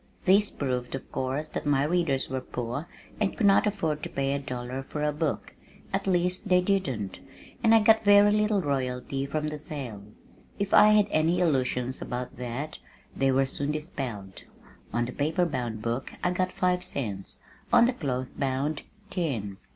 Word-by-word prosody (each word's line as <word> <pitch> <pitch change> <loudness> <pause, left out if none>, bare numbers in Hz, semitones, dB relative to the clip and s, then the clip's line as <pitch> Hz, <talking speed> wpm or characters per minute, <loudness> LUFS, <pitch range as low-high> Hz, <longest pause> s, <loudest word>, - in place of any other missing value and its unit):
This 200 +2 +5
proved 125 -2 -3
of 135 - -9
course, 135 +4 -2
that 150 - -4
my 140 -1 +3
readers 150 -4 +1
were 130 0 -3
poor 125 +5 -4 0.3
and 210 -2 0
could 220 - +2
not 200 +1 +5
afford 160 -8 -1
to - - -5
pay 135 0 -1
a 140 - -1
dollar 125 -1 -5
for 150 +2 -5
a 150 - +2
book, 150 0 -2 0.4
at - - -1
least 180 +2 +1
they 180 -1 +6
didn't, 165 - -1 0.4
and 225 0 +6
I 225 - +6
got 220 +1 +5
very 205 0 +7
little 210 -2 +2
royalty 135 -1 -2
from 150 +2 -2
the 150 0 -6
sale. 135 - -6 0.6
If 200 -1 -2
I 210 - +8
had 210 -1 +6
any 165 +3 +2
illusions 130 -6 0
about 125 0 -5
that 125 +5 -5 0.4
they 135 0 +2
were 135 +1 +3
soon 145 +2 -2
dispelled. 130 - -6 0.5
On 120 0 0
the 125 - -5
paper 155 +6 +1
bound 120 -8 -3
book 120 +3 -2
I 180 - +2
got 185 0 0
five 180 0 +1
cents, 100 -8 -4 0.3
on 235 - +7
the 250 - +2
cloth 130 - -3
bound, 140 +2 -1 0.3
ten. 115 - -2
145 Hz, 175 wpm, -27 LUFS, 130-180 Hz, 0.6 s, I